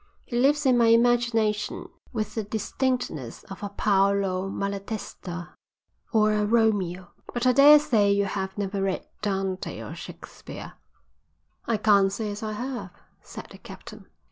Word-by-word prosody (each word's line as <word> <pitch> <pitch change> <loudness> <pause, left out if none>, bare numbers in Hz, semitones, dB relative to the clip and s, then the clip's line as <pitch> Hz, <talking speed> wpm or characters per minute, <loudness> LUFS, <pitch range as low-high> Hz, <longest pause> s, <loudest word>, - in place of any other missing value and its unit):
He 240 - -6
lives 280 +4 +3
in 255 -2 +4
my 230 - +5
imagination 230 -2 +2 0.2
with 215 -3 -3
the 220 - -2
distinctness 220 - -3
of 195 - -8
a 205 - -4
Paolo 195 -2 +1
Malatesta 195 -3 -5 0.6
or 215 -2 +3
a 210 0 +1
Romeo. 205 -5 +1 0.2
But 240 +1 -2
I 255 - +6
daresay 275 -6 +6
you 200 0 +2
have 190 0 -4
never 200 -1 -2
read 195 -1 -2
Dante 195 -2 -2
or - - -7
Shakespeare?" - - -10 0.9
"I 230 - +1
can't 200 -2 +4
say 210 +1 -3
as 205 - -7
I 215 -1 -3
have," 250 +3 -5 0.3
said - - -10
the - - -12
captain. - - -12
210 Hz, 140 wpm, -26 LUFS, 195-235 Hz, 0.9 s, I